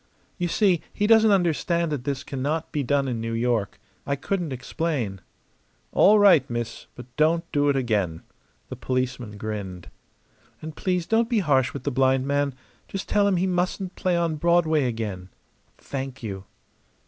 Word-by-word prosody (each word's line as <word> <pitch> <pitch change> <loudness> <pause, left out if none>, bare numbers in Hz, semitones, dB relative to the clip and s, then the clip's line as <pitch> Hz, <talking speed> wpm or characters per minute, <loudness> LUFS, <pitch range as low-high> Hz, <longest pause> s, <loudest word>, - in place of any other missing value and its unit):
"You 175 - 0
see, 185 -2 +2
he 205 - -1
doesn't 220 0 +6
understand 170 -3 +1
that 135 -4 -3
this 140 -1 -2
cannot 150 +4 -3
be 150 - -1
done 140 +1 +1
in 120 -3 -2
New 115 0 -3
York. 115 -3 -1 0.2
I 140 - -1
couldn't 175 +2 -2
explain." 125 - -3 0.7
"All 210 +2 +6
right, 180 -10 +5
miss; 120 -1 -5
but 125 0 -12
don't 165 +2 +2
do 145 0 +2
it 140 - +2
again." 105 -10 -1 0.5
The - - -5
policeman 125 -4 -3
grinned. 95 -4 -6 0.7
"And 155 0 -8
please 180 -2 -1
don't 225 +3 +2
be 235 - +1
harsh 135 -9 +2
with 140 - -7
the 145 - -1
blind 130 0 +2
man. 140 -1 0 0.3
Just 195 - -5
tell 205 -1 +3
him 200 - +2
he 180 - +1
mustn't 180 +1 -1
play 180 -2 0
on 165 -2 0
Broadway 160 -2 +3
again. 105 -6 -4 0.5
Thank 135 -2 -6
you!" 95 -3 -5
140 Hz, 165 wpm, -25 LUFS, 120-175 Hz, 0.7 s, doesn't